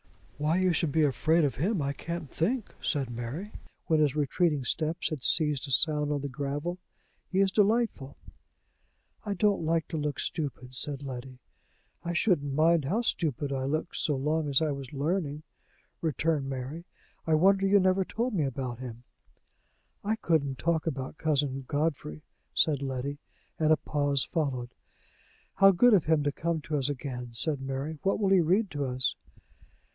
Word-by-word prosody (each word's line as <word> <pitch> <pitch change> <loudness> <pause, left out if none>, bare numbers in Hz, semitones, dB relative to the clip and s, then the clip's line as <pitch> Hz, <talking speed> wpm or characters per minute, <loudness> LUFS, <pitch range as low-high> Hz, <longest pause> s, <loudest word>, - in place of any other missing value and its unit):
"Why 155 +3 +2
you 185 -1 +3
should 165 -2 0
be 160 +2 +3
afraid 155 +4 +3
of 135 -6 0
him, 190 - 0
I 140 -1 -1
can't 170 +2 -5
think," 215 - -1
said 135 -6 -1
Mary, 125 - -5 0.3
when 160 -1 +2
his 150 -2 +2
retreating 150 0 +1
steps 155 +6 -1
had 155 -4 -4
ceased 150 -1 +2
to 135 - -6
sound 150 +2 +2
on 145 -1 -1
the 140 - -3
gravel. 145 +6 -3 0.5
"He 190 - +1
is 195 -1 +3
delightful!" 210 - +1 1.1
"I 205 -2 -2
don't 205 -4 +2
like 165 0 +1
to 165 - -3
look 150 -1 -2
stupid," 130 -5 -4
said 140 +1 -3
Letty. 130 -1 -7 0.7
"I 175 - -2
shouldn't 170 -7 +1
mind 160 0 +4
how 200 - +1
stupid 145 - -1
I 130 -1 -2
looked 155 +5 -2
so 150 - +1
long 150 +3 0
as 135 - +4
I 155 - +1
was 140 -2 -6
learning," 150 0 -2 0.6
returned 155 -2 0
Mary. 135 +6 -5 0.4
"I 160 - +4
wonder 195 +4 +4
you 200 +1 +5
never 190 0 +3
told 235 +6 -2
me 160 -7 +1
about 130 -2 -4
him!" 120 -2 -8 1.0
"I 215 +2 +1
couldn't 155 -10 0
talk 165 +1 0
about 135 -1 -4
Cousin 140 -3 0
Godfrey," 145 - -2 0.3
said 145 -4 +3
Letty; 135 +1 -3 0.4
and 155 -1 +3
a 155 - +6
pause 145 -2 +1
followed. 130 -7 -2 0.9
"How 195 0 +8
good 230 +6 +5
of 190 -6 +4
him 155 -1 +3
to 145 - +1
come 165 +2 -2
to 150 0 -2
us 135 - +1
again!" 125 -3 -5
said 140 +4 +1
Mary. 135 +3 -4
"What 195 - +1
will 200 -2 +2
he 190 -2 +5
read 185 +5 +2
to 145 -2 -2
us?" 130 0 0
150 Hz, 170 wpm, -29 LUFS, 135-170 Hz, 1.1 s, How